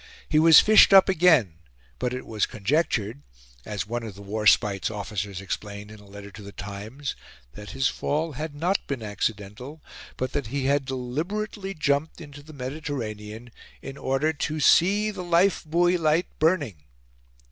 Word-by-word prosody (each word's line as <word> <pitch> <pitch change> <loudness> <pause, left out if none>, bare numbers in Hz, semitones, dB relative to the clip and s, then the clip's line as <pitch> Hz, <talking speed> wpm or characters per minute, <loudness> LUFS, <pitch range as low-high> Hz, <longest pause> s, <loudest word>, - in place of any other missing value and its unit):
He 155 - +3
was 160 0 +8
fished 215 -2 +6
up 190 - +8
again; 155 - +3 0.4
but 125 - -1
it 125 0 -5
was 110 -2 -1
conjectured 120 +1 -1 0.4
as 105 -4 -4
one 120 +3 -4
of 110 -4 -8
the 100 - -11
Warspite's 105 -1 +2
officers 100 -2 -5
explained 100 +1 -6
in 110 - -12
a 105 - -17
letter 100 0 -11
to 110 - -12
The 100 0 -10
Times 105 +9 -7 0.4
that 105 0 -10
his 135 0 0
fall 155 +3 -2
had 150 +2 -6
not 175 +6 -1
been 135 -5 -4
accidental, 105 +7 -4 0.4
but 130 - -3
that 140 -5 -3
he 135 +3 -3
had 140 0 +1
deliberately 180 - -4
jumped 150 0 -1
into 145 -3 -11
the 155 +2 -14
Mediterranean 120 -6 -6 0.3
in 135 - -7
order 140 +4 0
to 150 +1 -3
"see 205 +8 +4
the 185 - -7
life 175 +3 +2
buoy 175 +3 +2
light 160 +2 +2
burning." 155 - +1
135 Hz, 160 wpm, -25 LUFS, 105-160 Hz, 0.4 s, was